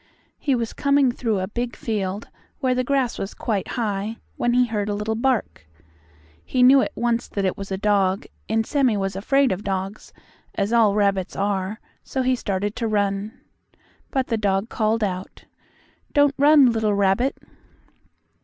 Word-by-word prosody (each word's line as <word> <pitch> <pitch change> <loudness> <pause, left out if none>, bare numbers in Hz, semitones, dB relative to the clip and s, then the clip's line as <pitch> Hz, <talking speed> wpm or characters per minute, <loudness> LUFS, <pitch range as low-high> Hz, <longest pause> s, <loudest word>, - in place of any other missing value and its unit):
He 280 -4 +1
was 230 -2 -3
coming 280 -2 +3
through 230 -3 -1
a 185 - -2
big 240 +3 -4
field, 205 -2 -3 0.3
where 255 -1 +1
the 255 0 0
grass 265 -2 0
was 195 - -5
quite 210 -6 -2
high, 215 -1 -2 0.2
when 240 0 0
he 250 0 +4
heard 210 -3 -2
a 205 - -1
little 210 +2 -2
bark. 230 - -1 0.8
He 255 -1 +1
knew 265 +2 +7
at - - -2
once 235 0 0
that 200 -1 -2
it 185 - 0
was 195 0 -8
a 190 - -1
dog, 195 -1 +1 0.2
and 225 0 +1
Sammie 260 -6 +2
was 195 -1 -2
afraid 270 +7 +2
of 190 +2 -3
dogs, 195 +1 -4 0.4
as 200 +3 -1
all 220 -4 +4
rabbits 200 -2 +1
are, 200 +1 -1 0.2
so 265 - -2
he 255 0 +2
started 205 -2 -2
to 230 - -1
run. 205 +2 -1 0.7
But 265 -1 0
the 230 - -1
dog 200 +1 0
called 220 0 0
out: 185 -2 -4 0.7
"Don't 290 -1 +4
run, 285 -3 +6
little 220 -2 +1
rabbit." 200 +7 +1
220 Hz, 170 wpm, -23 LUFS, 200-250 Hz, 0.8 s, knew